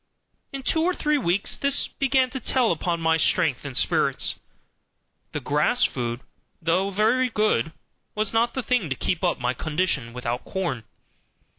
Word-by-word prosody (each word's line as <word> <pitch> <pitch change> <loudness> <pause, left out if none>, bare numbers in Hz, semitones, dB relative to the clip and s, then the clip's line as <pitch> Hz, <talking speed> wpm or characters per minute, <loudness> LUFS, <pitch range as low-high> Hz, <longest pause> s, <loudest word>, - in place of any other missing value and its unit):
In 275 -1 -6
two 320 - +2
or 360 +2 +1
three 300 -1 +1
weeks 190 -3 0
this 280 0 +1
began 265 -2 +1
to 265 - -4
tell 250 -1 +2
upon 170 +1 -1
my 160 0 +2
strength 145 -4 +1
and 140 -3 -4
spirits. - - +1 1.0
The - - -3
grass - - +2
food, 120 0 -1 0.4
though 175 +4 +1
very 225 +6 +2
good, 210 - +1 0.4
was 215 0 +1
not 235 +1 +1
the 260 - -2
thing 245 -11 0
to 135 - -1
keep 175 +6 -2
up 175 - +2
my 125 0 0
condition 150 -4 -1
without 125 0 -3
corn. 170 - -3
185 Hz, 160 wpm, -24 LUFS, -, 1.0 s, two